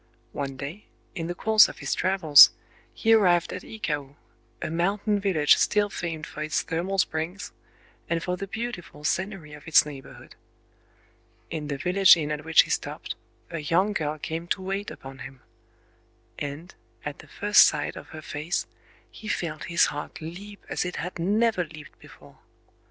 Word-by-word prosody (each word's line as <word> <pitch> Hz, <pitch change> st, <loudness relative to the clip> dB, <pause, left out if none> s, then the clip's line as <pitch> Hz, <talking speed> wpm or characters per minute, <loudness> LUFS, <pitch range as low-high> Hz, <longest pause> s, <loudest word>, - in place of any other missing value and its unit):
One 135 Hz, -2 st, -5 dB
day, 150 Hz, +10 st, -7 dB, 0.3 s
in 165 Hz, -3 st, -4 dB
the 175 Hz, -, -4 dB
course 215 Hz, +2 st, +5 dB
of -, -, -10 dB
his -, -, -2 dB
travels, 175 Hz, -6 st, +7 dB, 0.4 s
he 225 Hz, 0 st, +2 dB
arrived 180 Hz, -6 st, +3 dB
at -, -, -5 dB
Ikao,—a 150 Hz, -6 st, -7 dB
mountain 200 Hz, +5 st, 0 dB
village 180 Hz, -7 st, +4 dB
still 205 Hz, -1 st, +2 dB
famed 165 Hz, -3 st, -4 dB
for 150 Hz, -, -8 dB
its 155 Hz, 0 st, -1 dB
thermal 180 Hz, +4 st, -2 dB
springs, 180 Hz, +3 st, -2 dB, 0.6 s
and 165 Hz, 0 st, -1 dB
for 180 Hz, -, -1 dB
the 195 Hz, +2 st, -6 dB
beautiful 195 Hz, -8 st, -6 dB
scenery 185 Hz, -2 st, -2 dB
of 150 Hz, +1 st, -12 dB
its 155 Hz, -, +6 dB
neighborhood. 140 Hz, -3 st, -11 dB, 1.2 s
In 155 Hz, -2 st, -4 dB
the 140 Hz, -1 st, -3 dB
village 180 Hz, +3 st, +6 dB
inn 150 Hz, -2 st, -2 dB
at 150 Hz, 0 st, -3 dB
which 160 Hz, 0 st, +6 dB
he -, -, -7 dB
stopped, -, -, -3 dB, 0.4 s
a 165 Hz, -, -3 dB
young 180 Hz, +7 st, +1 dB
girl 155 Hz, -4 st, -2 dB
came 165 Hz, +3 st, -5 dB
to 190 Hz, -, -1 dB
wait 195 Hz, +2 st, -3 dB
upon 135 Hz, 0 st, -11 dB
him; 135 Hz, -2 st, -10 dB, 1.0 s
and, 145 Hz, +5 st, -6 dB, 0.3 s
at 150 Hz, -1 st, -5 dB
the -, -, -13 dB
first 205 Hz, 0 st, +5 dB
sight 150 Hz, -1 st, -2 dB
of -, -, -10 dB
her 155 Hz, 0 st, -10 dB
face, 150 Hz, +5 st, -3 dB, 0.5 s
he 220 Hz, -, -11 dB
felt 160 Hz, -6 st, -3 dB
his 170 Hz, 0 st, +3 dB
heart 145 Hz, -, -7 dB
leap 195 Hz, +6 st, -9 dB
as -, -, -1 dB
it 180 Hz, 0 st, -4 dB
had 180 Hz, 0 st, -5 dB
never 210 Hz, +2 st, +2 dB
leaped 155 Hz, -2 st, -13 dB
before. -, -, -17 dB
170 Hz, 165 wpm, -26 LUFS, 150-195 Hz, 1.2 s, travels